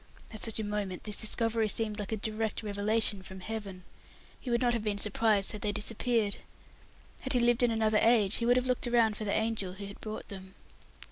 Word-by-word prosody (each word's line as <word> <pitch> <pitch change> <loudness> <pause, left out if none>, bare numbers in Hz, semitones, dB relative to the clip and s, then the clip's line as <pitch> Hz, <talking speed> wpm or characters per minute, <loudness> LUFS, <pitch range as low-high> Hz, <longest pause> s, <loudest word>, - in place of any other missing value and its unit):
At 215 - -6
such 225 -1 -1
a - - -1
moment, 205 -3 -3
this 210 -1 -2
discovery 225 0 0
seemed 215 0 -1
like 205 0 -4
a 220 - 0
direct 220 +1 -3
revelation 210 0 +2
from 190 0 -9
Heaven. 200 -3 -6 0.6
He 255 - -7
would 235 0 +2
not 240 -1 +2
have 230 -2 -1
been 210 -2 0
surprised 210 0 +2
had 210 - -7
they 210 - 0
disappeared. 220 0 0 0.8
Had 265 - -1
he 250 - +3
lived 240 +1 +3
in 245 - +4
another 220 -1 +2
age, 220 -3 +4
he 235 - -1
would 245 +1 +5
have 250 - +1
looked 250 -1 0
round 230 -3 +3
for 215 - -5
the 200 - -1
angel 220 -4 -1
who 200 +2 -7
had 200 0 -10
brought 215 0 -6
them. 190 -2 -10
215 Hz, 215 wpm, -30 LUFS, 205-230 Hz, 0.8 s, would